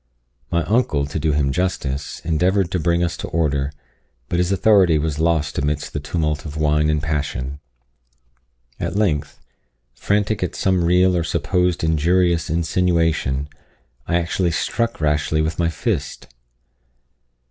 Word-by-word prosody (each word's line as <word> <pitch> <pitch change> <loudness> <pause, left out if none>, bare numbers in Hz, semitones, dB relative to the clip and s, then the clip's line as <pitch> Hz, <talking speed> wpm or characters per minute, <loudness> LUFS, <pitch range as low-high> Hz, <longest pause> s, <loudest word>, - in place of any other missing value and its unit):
My 85 -1 +1
uncle, 95 - +1
to 70 +2 -4
do 75 +1 +1
him 70 -2 +1
justice, 75 -4 -2
endeavoured 90 +3 +1
to 90 - 0
bring 85 +1 +1
us 85 - -1
to - - -5
order; 70 -4 0 0.6
but 85 - 0
his 90 +1 +1
authority 95 -4 +4
was 75 0 -2
lost 80 -2 +1
amidst 75 0 -2
the - - -2
tumult 75 0 -2
of 75 -2 -7
wine 75 0 +2
and 75 -1 0
passion. 70 -2 -3 1.2
At - - -3
length, 75 -9 0 0.5
frantic 105 - 0
at 90 - -2
some 95 -2 +1
real 90 +1 +4
or 85 - +1
supposed 90 +2 0
injurious 85 +2 +2
insinuation, 80 -4 +1 0.6
I 85 - 0
actually 85 +1 0
struck 115 +6 -1
Rashleigh 75 0 +1
with 80 +1 -3
my 85 -1 +2
fist. 85 - -3
80 Hz, 140 wpm, -21 LUFS, 75-90 Hz, 1.2 s, authority